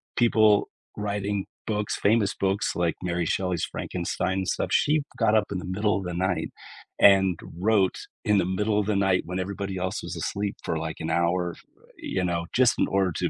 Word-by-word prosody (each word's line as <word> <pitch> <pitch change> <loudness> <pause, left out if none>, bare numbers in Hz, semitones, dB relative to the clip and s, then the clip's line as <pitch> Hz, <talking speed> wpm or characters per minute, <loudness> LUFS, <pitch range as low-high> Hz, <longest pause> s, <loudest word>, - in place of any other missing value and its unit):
people 110 -3 +4 0.3
writing 100 -1 -2 0.2
books, 105 -1 -1
famous 105 -1 +2
books 100 +2 0
like 85 -1 0
Mary 85 -1 -1
Shelley's 90 +1 0
"Frankenstein" 90 +1 -2
and 95 - -3
stuff. - - -1
She 150 +1 +3 0.2
got 105 - +3
up 110 -1 +3
in 100 - -1
the - - -7
middle 105 +3 0
of 95 - -5
the 90 - -3
night 90 -2 -1 0.5
and 95 -3 +6 0.2
wrote 100 -1 +3 0.3
in 105 -1 +3
the 95 - +2
middle 105 +3 0
of 105 - 0
the 105 0 0
night 95 -2 +2
when 90 +2 -4
everybody 100 0 -4
else 95 0 -2
was - - -5
asleep 100 0 -3
for 80 - -1
like 80 0 -4
an 80 - -3
hour, 85 +1 +1
f - - -16 0.4
you 95 - -2
know, 85 -1 -1
just 125 -1 +4
in - - +3
order 95 -2 +1
to - - -1
95 Hz, 200 wpm, -26 LUFS, 90-105 Hz, 0.5 s, and